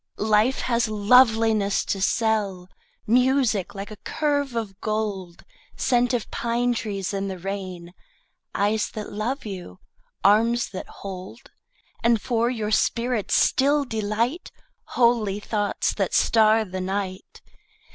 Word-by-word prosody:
Life 215 +4 +2
has 235 -1 +1
loveliness 220 -1 +3
to 195 - -2
sell, 200 -4 0 0.4
Music 250 -4 +2
like 200 +2 -7
a 215 - -9
curve 285 0 -1
of 215 -3 -4
gold, 205 -5 -3 0.3
Scent 245 -1 +2
of 235 - -4
pine 240 +1 0
trees 200 -4 -3
in 195 0 -2
the 190 -1 -5
rain, 185 -2 -6 0.6
Eyes 210 +2 +1
that 215 -1 -6
love 230 +7 -3
you, 180 - -7 0.5
arms 230 +4 +3
that 185 - -7
hold, 195 +8 -9 0.5
And 235 -1 +3
for 235 0 0
your 220 -4 -3
spirit's 235 0 +1
still 285 +2 +3
delight, 225 - -2 0.5
Holy 230 -5 +2
thoughts 205 -1 -1
that - - -1
star 220 0 +4
the 185 -1 -5
night. 190 0 -4
215 Hz, 125 wpm, -24 LUFS, 200-235 Hz, 0.6 s, star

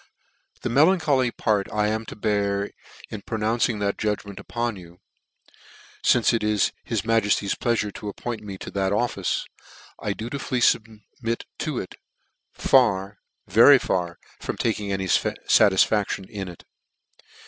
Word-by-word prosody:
c< - - -30
The - - -1
melancholy 145 -2 +3
part 105 -4 -1
1 105 0 +1
am 110 +1 -2
to - - -7
bear, 100 -1 0 0.4
in 105 - -6
pro 110 - -4
nouncing 115 +1 +1
that 100 0 -1
judgment 105 -2 -3
upon 120 -2 -3
you, 85 -2 -13 1.1
fmce 120 0 +4
it 115 - 0
is 105 -1 +2
his 115 -4 -2
majefty's 105 -3 +1
pleafure 110 -4 -1
to 105 - -6
appoint 115 +2 -5
me 100 -2 -7
to - - -8
that 95 0 0
office, 120 +4 -1 0.6
I - - -1
dutifully 125 +2 -3
fubmit 115 0 -1 0.2
to - - -2
it: - - -5 0.6
far, 100 -6 +2 0.3
very - - +7
far, 85 -2 -2 0.2
from - - -4
taking 105 -3 -1
any 95 0 -1
fatisfaction 100 +1 +2
in 100 -3 -6
it. 90 -2 -11
105 Hz, 140 wpm, -24 LUFS, 100-115 Hz, 1.1 s, very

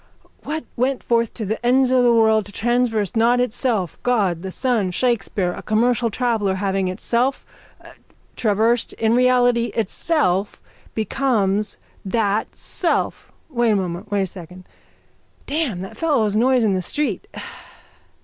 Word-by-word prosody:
_ - - -28
What 315 +1 -4
went 260 +2 0
forth 230 -1 +1
to 220 - -4
the 220 +4 -3
ends 255 +1 +3
of 255 -1 +4
the 240 - +5
world 220 -3 +3
to - - -12
traverse 235 -1 0
not 235 +2 +3
itself, 235 -6 -1
God, 200 -9 +1
the 190 - -5
sun, 230 -2 0
Shakespeare, 205 -3 0
a - - -7
commercial 235 +2 +1
traveller, 220 -4 0
having 195 -1 -1
itself 235 +8 -1 0.9
traversed 225 +2 +1
in 225 0 +1
reality 245 -1 +3
itself 210 - 0 0.4
becomes 215 -4 0 0.3
that 205 +1 -1
self. - - -1 0.2
Wait 240 -5 +1
a 215 - +3
moment. 185 +1 -3
Wait 205 -2 +1
a - - 0
second. 180 0 -11 0.8
Damn 280 - -2
that 190 - -10
fellow's 250 -11 +1
noise 250 +2 +3
in 210 -3 +2
the 185 - 0
street. 295 - -2
225 Hz, 140 wpm, -21 LUFS, 200-245 Hz, 0.9 s, the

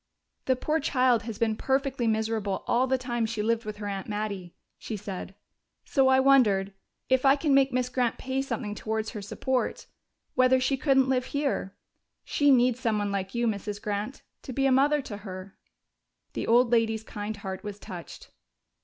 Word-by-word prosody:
"The 260 - +3
poor 305 +5 0
child 255 -5 +2
has 215 - -5
been 220 -1 +1
perfectly 265 -1 0
miserable 220 -3 -1
all 255 +2 +2
the 265 0 +2
time 240 -3 -2
she 220 -1 -3
lived 230 +1 0
with 215 -1 -5
her 210 - -6
aunt 195 -1 -4
Mattie," 205 -4 -4 0.2
she 220 - -5
said. 195 -1 -7 0.5
"So 270 -3 +3
I 265 0 +5
wondered 215 -8 +4 0.3
if 260 0 +2
I 270 0 +6
can 290 0 +1
make 270 0 +4
Miss 250 0 0
Grant 250 -2 0
pay 265 0 -2
something 245 -6 -3
towards 220 +1 -3
her 210 - -6
support 250 +5 -2 0.5
whether 255 0 +4
she 260 +2 +1
couldn't 270 -1 +3
live 255 -1 +1
here. 275 -9 -1 0.5
She 290 -1 +2
needs 250 -2 +4
someone 210 -4 0
like 195 +1 -3
you, 235 0 +1
Mrs. 205 -1 -2
Grant, 210 +5 -4 0.2
to - - -8
be 270 +2 0
a 270 - +4
mother 285 +2 +3
to 205 - -7
her." 190 -1 -9 0.8
The - - -3
old 240 +1 +4
lady's 225 -2 +2
kind 210 -1 -5
heart 190 -1 -6
was 205 -1 -6
touched. 180 -4 -10
230 Hz, 180 wpm, -27 LUFS, 210-260 Hz, 0.8 s, I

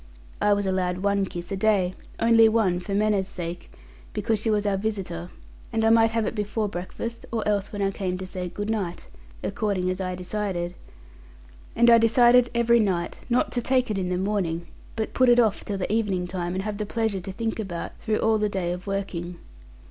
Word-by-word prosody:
I 205 0 +4
was 205 0 0
allowed 185 -1 -1
one 200 -1 +2
kiss 175 0 -7
a - - 0
day; 195 -3 +2 0.3
only 230 -1 +6
one 210 -6 +2
for 195 +2 -4
manners' 205 -2 +2
sake, 175 -2 -6 0.4
because 220 -2 0
she 220 - -1
was 210 -1 +1
our 200 -1 +2
visitor; 190 -4 -3 0.4
and 225 -1 +1
I 225 - +5
might 225 0 +5
have 225 -1 0
it - - -2
before 210 0 -1
breakfast, 220 +5 -5
or 225 -2 -1
else 205 -2 0
when 205 -1 -2
I 195 - +1
came 185 -2 -3
to 185 - -6
say 180 -1 -5
'good 205 +4 -3
night!' 195 -6 -3 0.4
according 200 -5 -1
as 185 +1 -4
I 185 -1 -2
decided. 180 -2 -3 1.0
And 235 +1 +4
I 235 -1 +8
decided 240 +2 +5
every 235 0 +4
night, 185 -5 0
not 245 +1 +2
to 245 - 0
take 255 -1 +1
it 205 - -1
in 180 -1 -2
the 180 - 0
morning, 185 -4 -1 0.3
but 220 -1 -3
put 255 -1 +4
it 240 0 +6
off 220 -4 +2
till 200 - -3
the 195 +2 -2
evening 200 -5 0
time, 175 0 -3
and 190 - -2
have 210 0 -4
the 210 - -2
pleasure 220 -3 -1
to 190 - -6
think 225 +3 -3
about, 180 -6 -5
through 215 -2 -1
all 220 -1 +3
the 210 0 +1
day 185 -3 -2
of 180 +2 -6
working. 180 -3 -3
205 Hz, 210 wpm, -25 LUFS, 185-225 Hz, 1.0 s, I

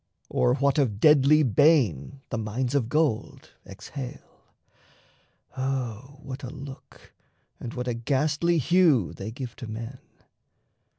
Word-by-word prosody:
Or 125 - +2
what 140 +1 +1
of 110 -8 0
deadly 150 +2 +6
bane 135 - +2
The 120 - -2
mines 120 +4 -2
of 130 -5 0
gold 150 -7 -1 0.2
exhale? 135 -3 -9 1.1
O 130 0 -4
what 135 +1 -7
a 125 - -6
look, 135 +1 -12 0.5
And 115 - -7
what 125 0 -4
a 120 - 0
ghastly 145 +8 +1
hue 160 - +3
they 100 - -6
give 125 +1 -7
to 120 - -7
men! 115 +3 -7
130 Hz, 125 wpm, -26 LUFS, 115-145 Hz, 1.1 s, deadly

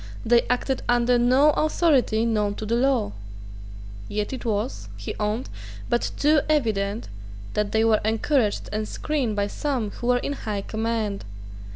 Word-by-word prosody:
They 235 +1 +4
acted 250 +1 0
under 240 0 +3
no 260 +5 +5
authority 285 -8 +2
known 210 -3 0
to 215 - -5
the 220 - -1
law. 250 - +2 1.0
Yet 210 +3 -3
it 260 - -6
was, 220 +2 -2
he - - -5
owned, 215 +4 -1 0.4
but 240 -1 +1
too 300 0 +4
evident 220 -7 0 0.5
that 210 -1 0
they 220 0 +2
were 225 -1 +3
encouraged 220 +1 +1
and 215 0 -2
screened 270 -7 -2
by 205 0 +1
some 240 -1 -2
who 240 - -6
were 250 0 +4
in 280 - -2
high 210 -7 -4
command. 220 -2 -2
230 Hz, 155 wpm, -24 LUFS, 210-260 Hz, 1.0 s, no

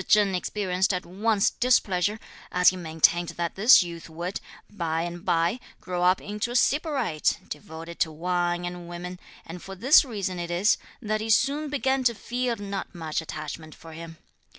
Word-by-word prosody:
Cheng 205 -2 +4
experienced 185 0 0
at 180 - -4
once 205 +3 +1
displeasure, 210 -4 +1 0.3
as 180 0 +6
he 185 - -4
maintained 170 0 +2
that 170 -1 -2
this 215 +2 +7
youth 170 -1 -8
would, 175 +4 -4 0.3
by 165 -5 -2
and 175 0 -6
bye, 170 +8 +1 0.2
grow 180 -1 -4
up 180 +1 +4
into 210 +3 -4
a 240 - -5
sybarite, 280 - +1
devoted 160 +3 -8
to 160 - +1
wine 175 +2 -1
and 175 -1 -6
women, 180 +1 -7 0.3
and 170 +2 -8
for 195 - -8
this 260 - +6
reason 200 -8 -4
it 170 0 -4
is, 175 +5 +2 0.2
that 215 0 -1
he 220 - -4
soon 280 +7 +2
began 270 -2 0
to 235 -1 +3
feel 245 +2 -2
not 200 -2 -6
much 160 -2 -3
attachment 155 0 -7
for 165 -1 -12
him. 165 0 -9
180 Hz, 175 wpm, -26 LUFS, 170-215 Hz, 0.3 s, this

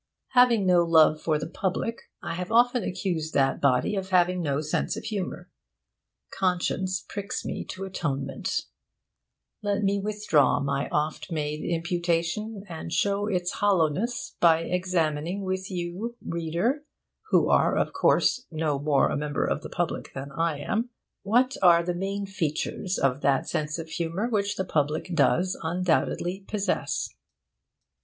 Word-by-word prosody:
Having 245 -5 +5
no 180 -2 +5
love 160 -2 +5
for 155 -2 +1
the 150 - -4
public, 190 +6 -3
I - - -3
have 180 +4 -4
often 245 +1 +4
accused 175 -4 -3
that 135 -1 +2
body 140 +8 +2
of 190 -1 -3
having 180 -1 +3
no 145 -3 0
sense 155 0 -1
of - - -6
humour. 195 -5 -4 0.8
Conscience 185 0 -1
pricks 200 0 -4
me - - -3
to 190 - -6
atonement. 150 -8 -2 1.0
Let 205 0 0
me 200 0 +2
withdraw 210 -7 +2
my 140 0 -1
oft 150 +4 -2
made 150 -1 -2
imputation, 175 +4 -1
and 165 -1 -7
show 200 +3 +1
its 180 -4 0
hollowness 200 +4 0
by 165 -1 +5
examining 180 0 -1
with 190 0 -3
you, 185 +6 -4
reader 170 - -1 0.5
(who - - +4
are, - - +3
of - - 0
course, 250 - +2
no 155 -3 -1
more 145 -1 +3
a - - 0
member 145 0 -1
of - - -1
the - - -8
public - - -3
than 135 +1 -6
I 165 +1 0
am), 225 - -2 0.3
what 250 +6 +2
are 170 -2 +6
the 175 +1 -1
main 195 +3 -3
features 185 0 -2
of 135 0 +1
that 140 -1 +2
sense 155 +1 -2
of 165 -1 -6
humour 170 +6 -2
which 205 -3 0
the 190 - -2
public 155 +2 -1
does 175 +4 +2
undoubtedly 175 +2 0
possess. 205 -2 -1
180 Hz, 150 wpm, -26 LUFS, 155-200 Hz, 1.0 s, are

